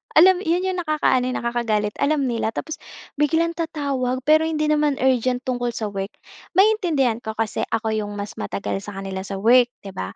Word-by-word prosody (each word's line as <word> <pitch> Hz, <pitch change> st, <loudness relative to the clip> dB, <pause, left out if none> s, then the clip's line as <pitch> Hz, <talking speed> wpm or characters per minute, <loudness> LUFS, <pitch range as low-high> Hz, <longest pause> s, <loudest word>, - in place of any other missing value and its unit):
Alam 360 Hz, +3 st, +7 dB
'yon 345 Hz, +3 st, +2 dB
'yong 375 Hz, -1 st, -1 dB
nakakaano, 305 Hz, -6 st, +1 dB
eh, 255 Hz, -, -2 dB
nakakagalit. 230 Hz, -3 st, 0 dB
Alam 290 Hz, -1 st, +2 dB
nila, 235 Hz, -4 st, -1 dB
tapos 315 Hz, -, -5 dB, 0.4 s
biglang 320 Hz, +3 st, +2 dB
tatawag 280 Hz, -6 st, -2 dB
pero 310 Hz, +2 st, +4 dB
hindi 310 Hz, -1 st, -1 dB
naman 300 Hz, -1 st, +2 dB
urgent 255 Hz, -1 st, +1 dB
tungkol 245 Hz, -2 st, -2 dB
sa 215 Hz, -2 st, -3 dB
work. 195 Hz, -1 st, -3 dB, 0.5 s
Maiintindihan 350 Hz, -, +3 dB
ko 220 Hz, -2 st, -6 dB
kasi 225 Hz, -1 st, -2 dB
ako 225 Hz, 0 st, -1 dB
'yong 210 Hz, -1 st, -2 dB
mas 205 Hz, +1 st, -5 dB
matagal 195 Hz, 0 st, -3 dB
sa 205 Hz, 0 st, -9 dB
kanila 195 Hz, 0 st, -5 dB
sa 195 Hz, -, -4 dB
work, 240 Hz, +5 st, +5 dB, 0.2 s
'di 195 Hz, -, -7 dB
ba. 95 Hz, -, -6 dB
255 Hz, 185 wpm, -22 LUFS, 215-310 Hz, 0.5 s, Alam